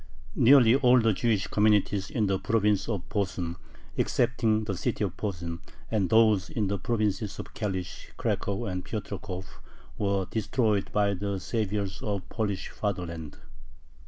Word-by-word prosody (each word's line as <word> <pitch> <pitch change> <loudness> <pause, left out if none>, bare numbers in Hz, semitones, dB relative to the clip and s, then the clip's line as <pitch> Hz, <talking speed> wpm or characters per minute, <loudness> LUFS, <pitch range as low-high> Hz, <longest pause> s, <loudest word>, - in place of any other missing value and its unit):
Nearly 120 -2 +7
all 130 -2 +5
the 115 -2 +3
Jewish 105 -1 +1
communities 105 -2 +2
in 110 -4 0
the 95 -1 +1
province 105 -2 +1
of 100 -4 -3
Posen, 90 -4 -2 0.4
excepting 115 -3 +1
the 100 -3 -2
city - - -1
of - - -2
Posen, 85 -5 -4 0.3
and 100 -5 +1
those 110 -6 +4
in 110 - -1
the 100 -1 -1
provinces 105 -1 -1
of - - -8
Kalish, 95 -4 -4
Cracow, 100 -1 -1
and 90 -2 -3
Piotrkov, 95 -3 -5 0.5
were 100 -2 +1
destroyed 110 -2 0
by 100 -1 +2
the 100 +1 -2
saviors 100 -2 -2
of 105 -6 -2
the - - -15
Polish 100 -4 -2
fatherland. 85 -7 -4
100 Hz, 145 wpm, -28 LUFS, 95-110 Hz, 0.5 s, Nearly